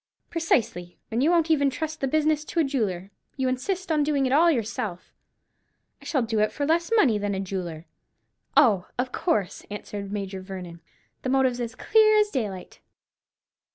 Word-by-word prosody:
"Precisely, 225 - 0
and 230 +2 0
you 295 - +4
won't 335 -2 +3
even 285 -3 +3
trust 315 +3 -5
the 270 - +1
business 305 +1 +1
to 335 - -3
a - - +5
jeweller; 205 - -2 0.3
you 265 -1 0
insist 350 +8 -2
on 305 -1 +3
doing 285 -2 +1
it 255 - 0
all 330 +4 +6
yourself." 220 - -3 0.9
"I - - -15
shall 270 -6 +1
do 225 -1 -1
it 215 0 +2
for 285 - -2
less 335 +6 +1
money 250 - +4
than 205 -1 -1
a - - -2
jeweller." 180 -4 -5 0.7
"Oh, 210 -10 +5
of 250 +1 -1
course," 255 - -1
answered 205 -1 -6
Major 195 -2 -4
Vernon; 180 -3 -8 0.4
"the 260 - -3
motive's 260 -2 +2
as 230 -1 -4
clear 430 -1 +4
as 420 -1 +3
daylight." 205 -8 -4
255 Hz, 175 wpm, -25 LUFS, 200-310 Hz, 0.9 s, all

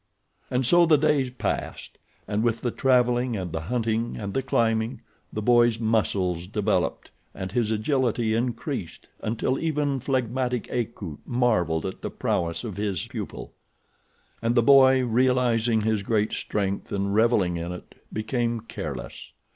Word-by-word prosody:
And 125 +1 0
so 175 +6 +5
the 155 -2 +6
days 145 -3 +2
passed, 125 - -4 0.3
and 105 +1 0
with 115 -1 0
the 120 - -1
traveling 125 -2 +2
and 90 -3 -4
the 80 - -2
hunting 115 +3 -1
and 100 -2 -5
the 135 - +1
climbing 115 -2 0 0.3
the 105 - -4
boy's 120 -1 +4
muscles 95 -6 0
developed 105 0 -1 0.2
and 95 -1 -5
his 115 0 0
agility 115 0 +1
increased 120 - -3
until 120 +4 -1
even 150 -4 0
phlegmatic 125 -2 -1
Akut 105 -9 -4
marvelled 110 -10 +1
at 95 - -5
the - - -3
prowess 85 -1 -1
of 105 -5 -6
his 100 -4 -2
pupil. - - -7 0.9
And 115 +1 +1
the 120 - +4
boy, 130 -1 +6
realizing 120 -2 +2
his 110 -1 +1
great 105 +1 0
strength 100 -1 -2
and 100 0 -1
revelling 105 -6 +3
in 85 +1 -4
it, 90 - -9 0.2
became 115 +1 -1
careless. 70 - -7
115 Hz, 145 wpm, -25 LUFS, 105-125 Hz, 0.9 s, the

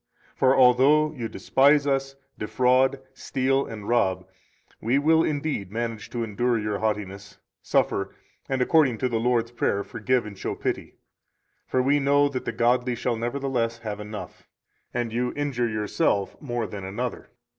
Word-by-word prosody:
For 130 +1 +3
although 135 +5 +5
you 120 -6 -5
despise 140 +2 +3
us, 135 -1 -1 0.2
defraud, 130 +4 +2
steal, 135 +1 0
and 105 -2 -8
rob, 95 -6 +1 0.5
we 120 +5 +2
will 160 +3 +4
indeed 145 -10 -2
manage 115 -1 -4
to 120 -1 -3
endure 115 +3 0
your 105 -1 -2
haughtiness, 105 -2 -3 0.2
suffer, - - 0 0.3
and, 130 -1 +1
according 135 -4 +3
to 130 - 0
the 115 -2 0
Lord's 115 -1 +1
Prayer, 100 -4 0
forgive 120 +3 -1
and 105 -1 -8
show 95 - -4
pity; - - -4 0.7
for 130 - +1
we 140 +3 +3
know 145 +1 +3
that 130 -2 -5
the - - -1
godly 120 +1 +1
shall 120 +1 -1
nevertheless 120 -1 -2
have 105 -3 -6
enough, 105 0 -8 0.4
and 120 -2 -2
you 125 +1 -1
injure 130 -5 -1
yourself 105 0 0
more 120 -5 -2
than 100 -1 -7
another. 110 +6 -4
120 Hz, 155 wpm, -25 LUFS, 110-135 Hz, 0.7 s, although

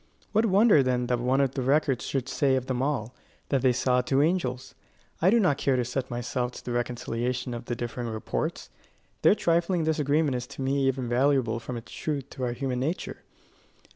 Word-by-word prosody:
What 220 +2 +3
wonder 200 -4 +5
then 125 -1 0
that 125 0 0
one 130 +3 +2
of 135 -2 +1
the 135 - -2
records 135 0 +1
should 135 -2 -2
say 135 0 +2
of 130 -1 -1
them 130 -1 -2
all, 130 -4 -1 0.4
that 135 -3 +1
they 130 -1 +4
saw 125 0 +2
two 135 +2 +2
angels? 130 -6 -1 0.5
I 175 - +5
do 235 +3 +4
not 165 -9 +2
care 135 - +2
to 125 -1 0
set 125 +2 -3
myself 125 +1 -2
to - - -11
the 125 - -4
reconciliation 120 +1 -2
of 120 0 -6
the 120 - -3
differing 120 0 -4
reports. 110 -1 -3 0.5
Their - - +6
trifling 170 -1 +1
disagreement 150 -1 +1
is 125 -1 -3
to 140 0 -7
me 135 0 +1
even 130 -2 -1
valuable 125 -2 +2
from 120 +1 -6
its 115 - -10
truth 140 -3 -4
to 130 - -6
our 120 - -1
human 130 0 -2
nature. 155 +8 -3
130 Hz, 200 wpm, -27 LUFS, 125-145 Hz, 0.5 s, Their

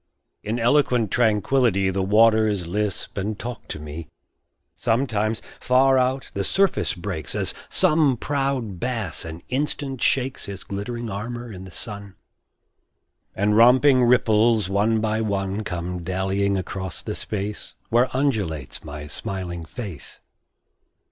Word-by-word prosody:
In 110 +3 -2
eloquent 120 -3 +2
tranquility 110 -3 +2
The 95 +1 -1
waters 110 -1 +4
lisp 100 +2 -3
and 105 +2 -2
talk 120 +1 -7
to - - -5
me. 75 +2 -8 0.7
Sometimes, 115 -3 0 0.2
far 130 +1 +4
out, 130 +1 0
the 100 - -1
surface 195 - +1
breaks, 90 -4 -4
As - - 0 0.2
some 155 -7 +3
proud 135 -8 -2
bass 115 -9 -3
an 80 +1 -8
instant 135 -1 -2
shakes 130 0 +1
His 100 -2 -7
glittering 115 +3 -5
armor 120 +4 -5
in 95 0 -9
the 95 - -11
sun, 100 -2 -7 1.2
And 105 +2 +2
romping 125 +3 +6
ripples, 115 -3 +4
one 110 +3 +2
by 110 0 0
one, 100 -1 -1
Come 90 -2 -4
dallyiong 95 +3 0
across 95 -1 -5
the - - -3
space 105 0 -5
Where 120 +3 +3
undulates 105 - -1
my 75 0 -7
smiling 85 +2 -5
face. 95 - -8
105 Hz, 130 wpm, -23 LUFS, 95-125 Hz, 1.2 s, romping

